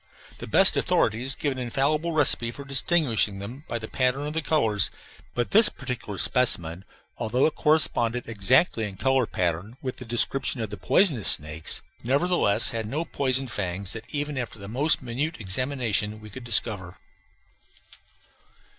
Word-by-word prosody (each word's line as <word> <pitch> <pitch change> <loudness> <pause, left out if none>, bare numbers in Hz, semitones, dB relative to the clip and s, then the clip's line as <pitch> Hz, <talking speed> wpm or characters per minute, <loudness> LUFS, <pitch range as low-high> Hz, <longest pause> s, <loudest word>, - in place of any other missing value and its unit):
The - - -7
best - - +6
authorities 125 +5 +1
give 145 - -1
an 130 - -6
infallible 140 +7 -1
recipe 145 -6 +4
for 140 +4 -9
distinguishing 135 - +2
them 120 +10 -9
by 120 - -3
the 110 -1 -7
pattern 130 +3 0
of 150 - -4
the 160 - -1
colors, 110 -11 +2 0.5
but 120 -1 -2
this 220 +2 +6
particular 125 -7 -7
specimen, 90 -9 0 0.3
although 120 +3 0
it 160 - +1
corresponded 125 -6 +1
exactly 115 - +1
in 100 -2 -8
color 130 -1 +1
pattern 90 +7 -3
with 130 -1 -6
the 125 - -9
description 125 +3 0
of 110 -3 -4
the 105 - -6
poisonous 150 - +1
snakes, 75 +2 -3 0.2
nevertheless 140 - +2
had 115 -2 -4
no 150 +9 -3
poison 130 -3 +1
fangs 95 -5 -2
that 110 0 -8
even 145 -1 -3
after 120 -2 -6
the 100 -1 -10
most 135 +7 +1
minute 135 +7 -4
examination 110 0 0
we 105 -1 -12
could 130 +4 -9
discover. 105 -6 +1
120 Hz, 155 wpm, -25 LUFS, 105-140 Hz, 0.5 s, best